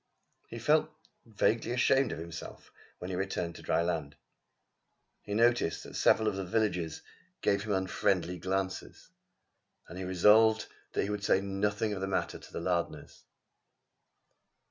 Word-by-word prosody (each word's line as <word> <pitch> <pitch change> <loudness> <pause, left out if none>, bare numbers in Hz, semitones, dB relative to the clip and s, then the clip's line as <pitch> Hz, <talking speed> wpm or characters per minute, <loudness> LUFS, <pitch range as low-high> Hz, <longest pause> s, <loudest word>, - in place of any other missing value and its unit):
He 115 - -8
felt 150 +7 +3 0.4
vaguely 115 +2 +1
ashamed 125 +1 +3
of - - -4
himself 85 0 -9 0.3
when 90 +1 -6
he - - -2
returned 90 -2 -2
to - - -11
dry 85 - +1
land. 80 -5 -2 1.1
He 105 - -5
noticed 115 -7 +2
that - - -10
several 110 - +4
of 105 - 0
the 95 - -3
villagers 90 -4 -1 0.4
gave 100 0 +2
him 105 -1 -1
unfriendly 90 -2 0
glances; 95 +1 -3 0.8
and 90 +2 -8
he - - -4
resolved 105 +5 +5 0.3
that - - +1
he 100 - -2
would 105 -1 -3
say 95 - +3
nothing 105 +2 -1
of 95 - -5
the 95 - -1
matter 95 - -2
to - - -14
the - - -4
Lardners. 85 0 -3
95 Hz, 150 wpm, -31 LUFS, 90-110 Hz, 1.1 s, resolved